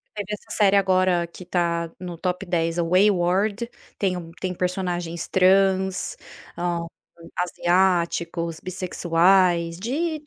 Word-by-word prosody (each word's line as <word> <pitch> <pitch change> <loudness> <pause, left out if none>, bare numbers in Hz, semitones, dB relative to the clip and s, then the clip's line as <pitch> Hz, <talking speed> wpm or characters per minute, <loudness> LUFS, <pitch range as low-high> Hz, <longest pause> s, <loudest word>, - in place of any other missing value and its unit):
teve 205 -2 -4
essa 210 - -7
série 200 -2 +4
agora 185 -2 +3
que 170 +2 -14
está 170 -2 -1
no 180 -2 -6
top 180 +1 -2
10 165 -1 -1
é 175 - +2
o 165 - -4
Whey 190 +3 +6
World 200 +5 0 0.3
tem 190 -2 0
um 170 -2 -7
tem 185 -1 -2
personagens 175 -2 -3
trans, 190 0 +2 0.4
ah, 175 -1 -1 0.6
asiáticos, 170 -2 0
bissexuais, 175 -1 +2
de 305 - -2
180 Hz, 130 wpm, -23 LUFS, 170-190 Hz, 0.6 s, Whey